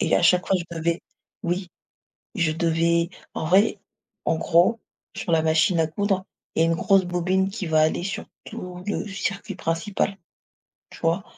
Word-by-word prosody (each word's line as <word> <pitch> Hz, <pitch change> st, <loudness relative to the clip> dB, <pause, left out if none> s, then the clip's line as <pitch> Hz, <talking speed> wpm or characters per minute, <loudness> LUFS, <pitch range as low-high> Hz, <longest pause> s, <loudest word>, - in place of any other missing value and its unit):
Et -, -, +3 dB
à -, -, +1 dB
chaque 180 Hz, +1 st, +4 dB
fois 195 Hz, -, +3 dB
je 170 Hz, -, -5 dB
devais 165 Hz, +1 st, 0 dB, 0.4 s
oui, 175 Hz, +1 st, -1 dB, 0.7 s
je 165 Hz, -5 st, +2 dB
devais 170 Hz, +1 st, +2 dB, 0.3 s
en -, -, -2 dB
vrai, 200 Hz, +5 st, +4 dB, 0.5 s
en 160 Hz, -, +2 dB
gros, 175 Hz, +8 st, +3 dB, 0.4 s
sur 175 Hz, -, -3 dB
la 160 Hz, -1 st, +3 dB
machine 160 Hz, +2 st, +3 dB
à 160 Hz, -, +4 dB
coudre, 195 Hz, +2 st, -1 dB, 0.3 s
il -, -, +2 dB
y -, -, +6 dB
a -, -, +5 dB
une 165 Hz, -, +2 dB
grosse 195 Hz, +2 st, +3 dB
bobine 180 Hz, +2 st, +1 dB
qui 195 Hz, -3 st, -4 dB
va 155 Hz, -1 st, +4 dB
aller 160 Hz, +2 st, +2 dB
sur 195 Hz, +3 st, -4 dB, 0.2 s
tout 180 Hz, -5 st, -7 dB
le 205 Hz, -, -2 dB
circuit 200 Hz, 0 st, -3 dB
principal. 190 Hz, +4 st, -1 dB, 0.7 s
Tu -, -, -12 dB
vois? 170 Hz, +4 st, +1 dB
175 Hz, 180 wpm, -24 LUFS, 165-195 Hz, 0.7 s, y